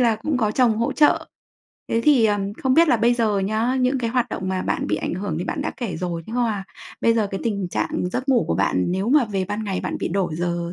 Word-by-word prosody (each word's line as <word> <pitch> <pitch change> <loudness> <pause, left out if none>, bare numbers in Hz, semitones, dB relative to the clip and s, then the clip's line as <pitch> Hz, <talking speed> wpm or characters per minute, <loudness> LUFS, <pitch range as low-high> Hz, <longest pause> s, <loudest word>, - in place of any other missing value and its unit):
là 230 -3 +3
cũng 275 +6 -2
có 220 -4 +1
chồng 230 -1 +2
hỗ 230 +2 0
trợ. 300 - +3 0.6
Thế 230 - +1
thì, 275 -7 +5
ừm, 205 -1 -1
không 260 +3 0
biết 330 +2 +5
là 245 - +4
bây 235 +2 +3
giờ 220 -4 +1
nhá, 220 +6 0
những 255 +2 +2
cái 235 -2 -2
hoạt 250 0 0
động 190 - -4
mà 185 0 -1
bạn - - -1
bị - - +1
ảnh - - -3
hưởng 185 -3 -3
thì 175 - -3
bạn 290 - -3
đã 310 - -3
kể 215 -10 -4
rồi, 170 -1 -3
nhưng 225 - -5
mà 220 -5 0 0.4
bây 230 - +3
giờ 220 -2 +1
cái 195 - -4
tình 200 -5 -1
trạng 180 - -2
giấc 260 +2 -3
ngủ 255 -4 +3
của - - +1
bạn 90 +2 +1
nếu 190 +4 -1
mà 285 0 +5
về 195 -4 -2
ban 210 +4 -4
ngày 195 -3 -2
bạn - - -3
bị - - -2
đổi 175 -2 -1
giờ 175 0 -2
215 Hz, 275 wpm, -22 LUFS, 190-245 Hz, 0.6 s, thì